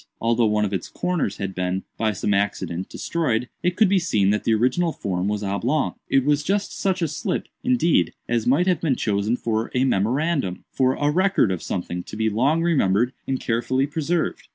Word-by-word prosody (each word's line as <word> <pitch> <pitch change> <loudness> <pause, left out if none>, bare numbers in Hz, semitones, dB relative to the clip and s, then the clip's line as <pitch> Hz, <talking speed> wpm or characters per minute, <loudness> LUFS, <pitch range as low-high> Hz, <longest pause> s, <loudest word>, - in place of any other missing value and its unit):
Although 115 0 +2
one 105 0 +2
of 100 - -3
its 95 - -3
corners 175 - -2
had 95 -1 -4
been, 90 +1 -2
by 110 -1 0
some 105 +1 -1
accident, 95 -3 -1
destroyed, 125 -8 -1
it 180 0 0
could 215 +1 +5
be 195 0 +3
seen 105 - +2
that 105 - -1
the 115 - +3
original 160 +10 +1
form 95 - -2
was 105 0 -1
oblong. 120 +9 0 0.2
It 135 -1 +3
was 145 0 +3
just 200 +6 -1
such 185 -2 0
a - - +2
slip, 150 - -3 0.2
indeed, 175 - +2
as 120 -2 0
might 140 +8 +4
have 185 -1 +1
been 150 -6 +1
chosen 105 +2 0
for 110 -1 -1
a 125 - +3
memorandum—for 130 - 0
a 145 0 +1
record 185 - +2
of 90 - -3
something 90 -1 -3
to 90 - -10
be 110 0 +1
long 140 +10 +2
remembered 125 - +2
and 130 -1 -1
carefully 130 +3 0
preserved." 160 +3 -2
125 Hz, 195 wpm, -23 LUFS, 105-160 Hz, 0.2 s, could